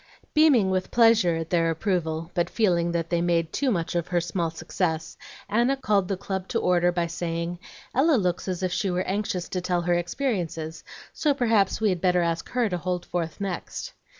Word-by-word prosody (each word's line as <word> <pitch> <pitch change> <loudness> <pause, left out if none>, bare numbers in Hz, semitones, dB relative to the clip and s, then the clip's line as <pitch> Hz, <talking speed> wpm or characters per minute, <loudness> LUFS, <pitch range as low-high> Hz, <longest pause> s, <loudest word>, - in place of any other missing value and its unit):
Beaming 275 -11 +5
with 185 0 -1
pleasure 225 -7 +4
at 165 0 -4
their 165 -2 +3
approval, 165 -2 -1
but 175 0 0
feeling 175 -6 +1
that 170 0 -2
they 170 -1 +2
made 170 -2 +1
too 280 - +1
much 170 -8 -1
of 175 -1 -1
her 175 -1 +1
small 170 0 -1
success, 165 0 -3 0.3
Anna 240 +5 +2
called 205 -7 +1
the 195 - -2
club 190 0 -4
to 230 - -1
order 175 -2 +3
by 175 -1 0
saying, 170 0 -3 0.3
"Ella 295 +4 +4
looks 180 -6 0
as 185 0 -3
if 185 - 0
she 195 - 0
were 180 +1 0
anxious 190 -2 -2
to 180 - -2
tell 180 -1 0
her 175 +1 +1
experiences, 175 - -2 0.3
so 295 -3 +1
perhaps 225 -8 +2
we 220 -1 +2
had 180 -3 -1
better 180 -1 +3
ask 165 -1 -2
her 245 -2 +1
to 180 -3 -2
hold 180 0 -2
forth 165 -2 -3
next." 195 -3 -5
180 Hz, 200 wpm, -25 LUFS, 170-200 Hz, 0.3 s, Beaming